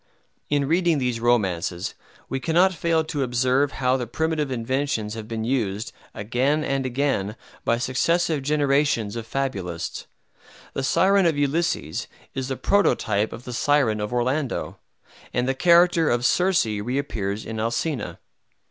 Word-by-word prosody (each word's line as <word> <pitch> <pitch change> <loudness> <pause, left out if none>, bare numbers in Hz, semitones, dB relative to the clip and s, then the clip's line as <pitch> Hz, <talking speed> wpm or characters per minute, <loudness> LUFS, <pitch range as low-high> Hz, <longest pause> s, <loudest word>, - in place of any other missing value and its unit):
In 145 -1 +1
reading 170 0 +2
these 125 -3 -1
romances, 95 -7 0 0.3
we 135 - -2
cannot 175 +5 +3
fail 165 -1 +1
to 155 -2 -3
observe 130 +2 +1
how 130 0 +1
the 125 -2 -4
primitive 155 +3 -1
inventions 130 -2 -1
have 110 -1 -7
been 110 -1 -3
used, 110 -4 -1 0.2
again 125 +8 0
and 135 -2 -1
again, 125 -6 -1 0.3
by 115 - +2
successive 155 +5 +1
generations 140 -6 +1
of 115 -1 -5
fabulists. 100 -11 -3 0.7
The - - -2
Siren 190 +7 +3
of 160 -3 +1
Ulysses 140 - -1 0.3
is 135 -1 -3
the 135 -1 -3
prototype 110 - +2
of 115 - -8
the 125 - -7
Siren 125 -4 +2
of 105 - -3
Orlando, 130 +3 -1 0.6
and 125 +1 +1
the 135 - +2
character 170 +2 +4
of 120 +1 +1
Circe 180 +3 +3
reappears 105 -2 -3
in 110 0 -5
Alcina. 120 +6 -2
130 Hz, 140 wpm, -24 LUFS, 115-150 Hz, 0.7 s, character